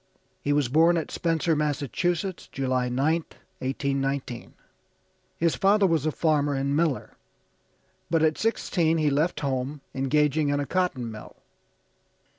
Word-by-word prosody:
He 145 - -1
was 145 -2 +2
born 165 +6 +4
at 160 - -3
Spencer, 165 -1 0
Massachusetts, 160 +5 -1
July 130 -2 0
9th, 150 +6 -1 0.2
1819. 135 -2 -2 0.8
His 165 -2 +2
father 200 +6 +4
was 160 -4 +1
a - - +1
farmer 145 -3 +1
and 140 +1 0
miller, 155 -4 0 1.0
but 165 -1 +2
at 155 -1 +3
sixteen 170 -7 +1
he 155 -2 +2
left 155 +5 0
home, 135 +1 -2
engaging 150 +2 +1
in 145 0 +1
a 145 - -1
cotton 140 -10 -1
mill. 110 - -10
150 Hz, 130 wpm, -26 LUFS, 135-165 Hz, 1.0 s, born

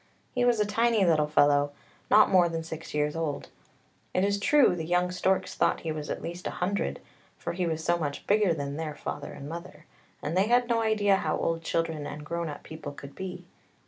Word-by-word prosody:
He 250 - +1
was 240 -2 +3
a 210 - +3
tiny 225 0 +2
little 155 -3 +3
fellow, 145 -1 +3 0.4
not 215 - +6
more 180 -2 +5
than 165 -1 -3
six 160 0 -7
years 150 +1 0
old. 160 -3 -3 0.7
It 185 - +3
is 200 0 +1
true, 275 -2 +4
the 165 - -4
young 180 +2 +1
storks 185 +1 0
thought - - +1
he 160 - -3
was 155 -1 -5
at - - -4
least 175 +2 -5
a - - -5
hundred, 195 +3 -1 0.4
for - - -4
he 180 0 -1
was 160 -1 -2
so 175 +1 +2
much 145 -3 -4
bigger 205 -2 +3
than 140 -2 -3
their 155 -2 -4
father 145 -1 -5
and 140 - -8
mother, 170 +2 -8 0.3
and 155 +4 -3
they 190 +3 +3
had 245 +1 +3
no 235 -1 +2
idea 210 -3 +3
how - - -1
old 165 0 -1
children 165 -2 -1
and 150 +1 -7
grown 170 0 -3
up 145 - -8
people 155 -2 -8
could 140 0 -10
be. 180 -2 -7
170 Hz, 215 wpm, -28 LUFS, 155-200 Hz, 0.7 s, not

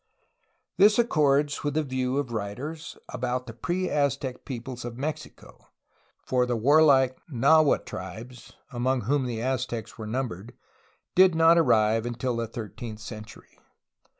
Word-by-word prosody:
This 205 +2 +6
accords 150 - +2
with 145 -1 -2
the 155 - +2
view 130 -1 -2
of 140 -4 -2
writers 125 +10 -5
about 125 0 -3
the 115 - -9
pre 175 +11 -2
Aztec 140 -4 -1
peoples 125 -1 -6
of 120 -1 -7
Mexico, 150 +4 -7 0.6
for 125 -1 +1
the 120 - 0
warlike 135 +1 +4
Nahua 145 +4 +4
tribes 110 +7 -9 0.2
(among 130 +1 0
whom 130 +4 0
the 115 -2 -4
Aztecs 120 -3 -3
were 110 - -6
numbered) 115 -3 -4 0.6
did 185 -2 +5
not 165 +1 +6
arrive 110 -6 +3
until 120 +1 -2
the 115 0 -2
thirteenth 110 0 -7
century. 110 0 -11
125 Hz, 135 wpm, -26 LUFS, 115-145 Hz, 0.6 s, This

